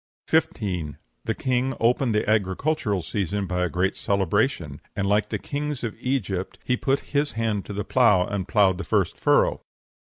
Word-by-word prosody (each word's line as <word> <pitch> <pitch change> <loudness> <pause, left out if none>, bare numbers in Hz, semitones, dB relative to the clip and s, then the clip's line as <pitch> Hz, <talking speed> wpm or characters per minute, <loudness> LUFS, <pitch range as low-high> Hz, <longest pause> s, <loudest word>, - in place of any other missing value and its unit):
15. 90 -7 0 0.3
The - - -1
king 130 0 0
opened 120 0 +2
the 105 - +1
agricultural 105 - 0
season 100 +3 -2
by 90 -1 -1
a 90 - 0
great 95 +3 0
celebration, 100 - 0
and, 100 - -1
like 105 +1 +2
the - - -1
kings 145 -2 -4
of 115 -3 -3
Egypt, 100 -8 -2
he 125 - +1
put 135 +2 0
his 145 +1 +1
hand 110 -3 -1
to 105 - -6
the 105 +1 -3
plough, 105 -8 +4
and 95 -2 -3
ploughed 95 -4 +3
the - - -3
first - - +1
furrow. - - +2
105 Hz, 175 wpm, -25 LUFS, 95-125 Hz, 0.3 s, plough